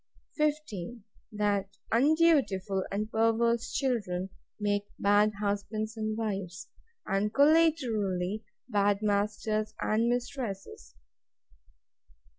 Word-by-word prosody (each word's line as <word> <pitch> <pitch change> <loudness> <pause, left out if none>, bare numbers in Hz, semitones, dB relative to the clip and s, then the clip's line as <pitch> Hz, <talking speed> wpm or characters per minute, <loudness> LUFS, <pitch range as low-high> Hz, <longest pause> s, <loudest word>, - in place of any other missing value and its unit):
15. 245 - -2 0.3
That 200 -2 -1
undutiful 245 - +3
and 210 +2 -2
perverse 230 +1 +2
children 195 -9 -1 0.3
make 205 -1 0
bad 205 +1 +4
husbands 210 +2 -2
and 215 -1 -2
wives: 195 -4 -4 0.4
And, 200 +1 0
collaterally, 225 - +2 0.2
bad 205 -2 +1
masters 215 +1 0
and 225 +2 +1
mistresses. 240 - -4
215 Hz, 80 wpm, -29 LUFS, 200-235 Hz, 0.4 s, bad